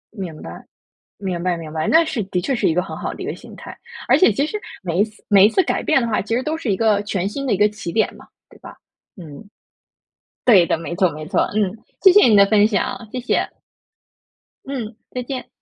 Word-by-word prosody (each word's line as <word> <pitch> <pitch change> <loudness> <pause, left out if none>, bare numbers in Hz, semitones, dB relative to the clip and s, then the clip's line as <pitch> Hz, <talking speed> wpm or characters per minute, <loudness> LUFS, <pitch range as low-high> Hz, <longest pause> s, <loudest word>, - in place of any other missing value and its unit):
明 180 -7 -7
白， 85 - -9 0.6
明 185 -4 -4
白， 180 -1 0
明 160 -2 -8
白， 155 0 -2
那 325 +1 +5
是 265 -8 -3
的 185 -1 -2
确 265 +10 -1
是 240 - +1
一 160 - +1
个 180 - +1
很 195 - -8
好 - - -4
的 - - -8
一 - - -5
个 - - -3
心 - - -13
态。 - - -10 0.3
而 - - +6
且 370 - +5
其 280 +8 0
实 425 - -4 0.2
每 175 -2 -3
一 - - +5
次 215 0 -15
每 200 -2 +6
一 - - +4
次 300 +12 +2
改 - - -2
变 315 -3 +2
的 235 - -2
话， 215 - 0
其 215 +3 -3
实 250 - 0
都 310 +3 -2
是 275 -10 -2
一 - - 0
个 210 -1 +2
全 195 -2 -2
新 275 +6 -5
的 255 - 0
一 - - +2
个 210 +2 +4
起 210 -5 -7
点 220 - +1
嘛， - - -16 0.2
对 - - -19
吧？ - - -12 0.4
嗯， 170 +2 -11 1.0
对 195 -8 +6
的， - - +1
没 165 +1 -6
错， 185 -2 +3
没 155 +1 -8
错， - - 0
嗯， 210 -1 0 0.3
谢 380 - +8
谢 415 -4 +6
你 220 -3 +5
的 200 - +7
分 210 0 +4
享， 220 +2 -2
谢 255 - -4
谢。 250 - 0 1.2
嗯， 245 -5 -5 0.2
再 250 - -4
见。 255 +1 -6
210 Hz, 265 characters per minute, -20 LUFS, 180-245 Hz, 1.2 s, 谢